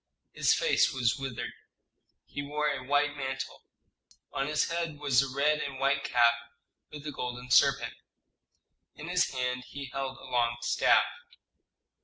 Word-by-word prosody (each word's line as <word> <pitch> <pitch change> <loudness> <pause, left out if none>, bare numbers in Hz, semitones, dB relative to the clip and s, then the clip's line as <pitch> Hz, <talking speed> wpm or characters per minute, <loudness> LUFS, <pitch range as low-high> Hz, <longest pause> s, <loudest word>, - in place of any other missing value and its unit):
His - - +3
face - - +3
was 120 -2 +1
withered. 135 -3 -4 0.7
He 145 - -5
wore 150 +1 -1
a 135 -3 -4
white 145 +2 +1
mantle; 135 -1 -4 0.7
on 135 - -1
his 150 0 +1
head 165 -3 -2
was 140 -3 +3
a 135 - -2
red 145 +3 +2
and 140 -2 -4
white 140 0 +2
cap 120 -1 +4 0.6
with 150 0 -9
a 150 - -3
golden 125 -1 -5
serpent; - - +4 1.0
in - - -8
his - - +2
hand 125 -1 -2
he 140 0 -7
held 135 -1 -3
a - - -15
long 120 -1 0
staff. - - +4
135 Hz, 150 wpm, -29 LUFS, 125-145 Hz, 1.0 s, cap